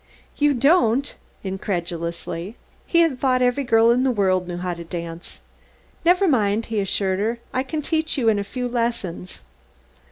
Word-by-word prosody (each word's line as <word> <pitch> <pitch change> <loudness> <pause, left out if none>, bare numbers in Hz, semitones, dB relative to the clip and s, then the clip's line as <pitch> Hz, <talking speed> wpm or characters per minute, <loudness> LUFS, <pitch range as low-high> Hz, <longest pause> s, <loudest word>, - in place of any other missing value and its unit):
"You 290 -1 +2
don't?" 275 -1 +3 0.3
incredulously. 175 -1 -4 0.3
He 340 - +4
had 310 -7 +1
thought 255 -2 +2
every 250 +3 +1
girl 230 -2 +4
in 245 +1 +3
the 265 - +2
world 190 -6 +1
knew 175 -1 -4
how 180 0 -2
to 170 0 -8
dance. 170 0 -7 0.6
"Never 360 +3 +4
mind," 220 - +2
he 225 -2 -2
assured 195 -1 0
her, 225 +3 0 0.2
"I 255 - +1
can 295 +3 -4
teach 320 0 -1
you 245 -4 +1
in 215 -2 +4
a - - -1
few 250 +5 -4
lessons." 230 -7 -3
225 Hz, 165 wpm, -22 LUFS, 185-260 Hz, 0.6 s, He